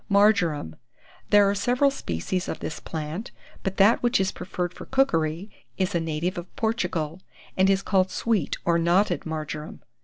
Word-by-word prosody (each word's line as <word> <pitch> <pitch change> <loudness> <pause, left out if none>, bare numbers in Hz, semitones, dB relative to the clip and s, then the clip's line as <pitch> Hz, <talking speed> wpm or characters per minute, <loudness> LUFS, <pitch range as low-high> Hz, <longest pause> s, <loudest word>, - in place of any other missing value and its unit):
MARJORAM. 200 - +3 0.5
There 205 -1 +6
are 200 - +2
several 250 +7 +2
species 180 - -3
of - - -3
this - - -5
plant; 160 +6 -5 0.3
but 195 0 -3
that 205 +4 +5
which 240 -2 +2
is 190 0 +1
preferred 180 -1 -4
for - - -10
cookery 180 - +1 0.3
is 190 +1 0
a 170 - +2
native 165 +2 -2
of 175 - -11
Portugal, 180 -7 -1 0.3
and 190 +1 +4
is 195 0 +2
called 190 -1 +2
sweet 215 -8 0
or 170 -1 +3
knotted 175 +1 +2
marjoram. 155 -1 -5
185 Hz, 160 wpm, -25 LUFS, 165-205 Hz, 0.5 s, There